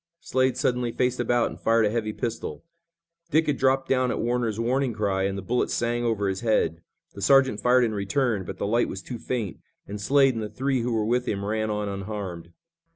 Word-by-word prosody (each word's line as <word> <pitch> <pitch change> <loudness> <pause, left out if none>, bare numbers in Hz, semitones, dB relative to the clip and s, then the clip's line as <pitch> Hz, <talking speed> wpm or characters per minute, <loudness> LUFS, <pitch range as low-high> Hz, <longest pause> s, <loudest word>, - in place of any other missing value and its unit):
Slade 130 -7 +1
suddenly 125 -1 0
faced 125 +1 0
about 120 0 +1
and - - -10
fired 115 0 +3
a 105 - +1
heavy 110 -2 -1
pistol. 115 +1 -4 0.7
Dick 160 +1 +3
had 150 -3 0
dropped 135 0 +2
down 130 -1 +2
at - - -1
Warner's 115 -2 -1
warning 125 +2 +1
cry 100 -3 0
and 100 0 -2
the 100 - -5
bullet 120 +5 0
sang 120 0 -1
over 110 -4 0
his 95 0 -1
head. 85 -8 +1 0.3
The 100 - -9
sergeant 130 -1 +4
fired 125 0 +4
in 115 -2 0
return, 105 +1 0
but - - -7
the - - -2
light 115 +4 +2
was 95 - -6
too 120 -3 -6
faint, 115 -8 -3 0.3
and 105 +1 -7
Slade 135 +4 +4
and 115 - -3
the 105 - -4
three 130 +1 -1
who 120 +1 -1
were 110 -2 0
with 125 +2 0
him 100 -1 -2
ran 110 +1 -1
on 105 -1 -2
unharmed. 100 -4 -5
115 Hz, 220 wpm, -25 LUFS, 105-125 Hz, 0.7 s, sergeant